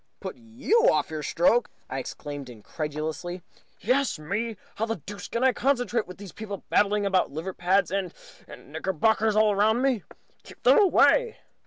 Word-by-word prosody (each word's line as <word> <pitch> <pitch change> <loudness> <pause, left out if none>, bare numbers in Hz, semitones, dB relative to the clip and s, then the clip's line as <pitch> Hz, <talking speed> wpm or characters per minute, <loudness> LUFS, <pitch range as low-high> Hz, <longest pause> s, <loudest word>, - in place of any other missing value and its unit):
"Put - - -6
you 270 - +2
off - - 0
your 155 -1 -4
stroke!" 180 +10 +2 0.2
I 135 - -4
exclaimed, 145 0 -7
incredulously. 155 - -5 0.4
"Yes, 260 +4 +1
me! 205 +8 -3 0.2
How 225 - -1
the 225 - -1
deuce 195 +2 -9
can 235 - -2
I 260 -1 +4
concentrate, 245 -4 0
with 180 - -10 0.2
people 205 -3 -7
babbling 205 0 +3
about 190 -2 +2
liver 165 +6 -5
pads, 185 +3 +1
and 190 -3 -2 0.4
and - - -13
knickerbockers 205 +7 +1
all 215 -1 +4
round 220 +5 +2
me? 260 -6 +2 0.4
Keep - - -16
them - - +6
away!" 445 +4 +4
205 Hz, 160 wpm, -26 LUFS, 170-235 Hz, 0.4 s, them